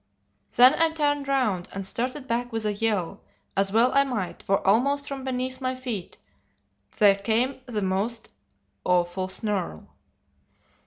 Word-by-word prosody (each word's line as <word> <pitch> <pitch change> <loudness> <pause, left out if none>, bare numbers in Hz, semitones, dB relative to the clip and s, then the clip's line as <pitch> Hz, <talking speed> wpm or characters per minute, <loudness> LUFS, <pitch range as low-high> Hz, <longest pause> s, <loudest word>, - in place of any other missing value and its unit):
Then 250 +3 +8
I 330 - +5
turned 290 -3 0
round, 220 -10 0
and 195 0 -5
started 255 +6 -3
back 245 +1 -1
with 225 -1 -2
a 210 - +1
yell 200 -3 -1 0.3
as 195 0 +1
well 230 +4 +4
I 275 - +5
might, 230 -9 -4
for 195 0 0
almost 280 +8 +2
from 275 -1 -5
beneath 260 0 -2
my 255 0 -1
feet 245 -8 -6 0.8
there 205 -2 +7
came 230 +7 0
a 220 -4 -2
most 205 +5 -1 0.5
awful 180 +1 +1
snarl. 190 - -3
230 Hz, 145 wpm, -26 LUFS, 195-260 Hz, 0.8 s, Then